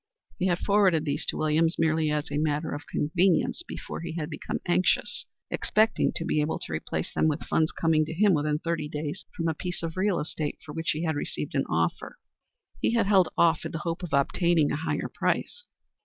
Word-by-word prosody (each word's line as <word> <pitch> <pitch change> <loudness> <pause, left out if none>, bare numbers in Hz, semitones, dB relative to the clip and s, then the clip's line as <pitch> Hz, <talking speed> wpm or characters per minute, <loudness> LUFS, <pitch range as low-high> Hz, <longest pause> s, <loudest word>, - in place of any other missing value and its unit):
He 185 - +2
had 175 -2 +2
forwarded 190 -6 +3
these 145 -2 -2
to - - -1
Williams 160 +2 +2
merely 160 -1 +2
as 150 0 -1
a 145 - 0
matter 150 +1 0
of 145 +2 -7
convenience 175 - +1
before 350 - -7
he 165 -1 -5
had 160 -1 -4
become 150 - -3
anxious, 175 +1 +1 0.2
expecting 220 0 +2
to 165 - -3
be 150 - +1
able 150 +2 -1
to - - -6
replace 80 - -3
them - - +2
with 150 -2 -1
funds 160 0 +1
coming 160 -1 +2
to 155 - -5
him 205 +2 +4
within 150 -1 +1
thirty 165 -2 -2
days 150 +4 -4
from 165 - 0
a 160 - +1
piece 175 +2 -5
of 165 -1 -3
real 195 0 +2
estate 150 0 -3
for 150 - -8
which 165 0 -2
he 155 +2 -3
had 160 -2 0
received 145 +2 -4
an 135 -2 +1
offer. 85 +1 -1 0.6
He 235 - +2
had 230 - +3
held 195 -3 +4
off 165 -2 +4
in - - -5
the - - -2
hope 165 +1 -2
of 180 - -6
obtaining 160 +2 +2
a - - 0
higher 155 +2 -2
price. 485 0 -1
160 Hz, 215 wpm, -27 LUFS, 150-175 Hz, 0.6 s, him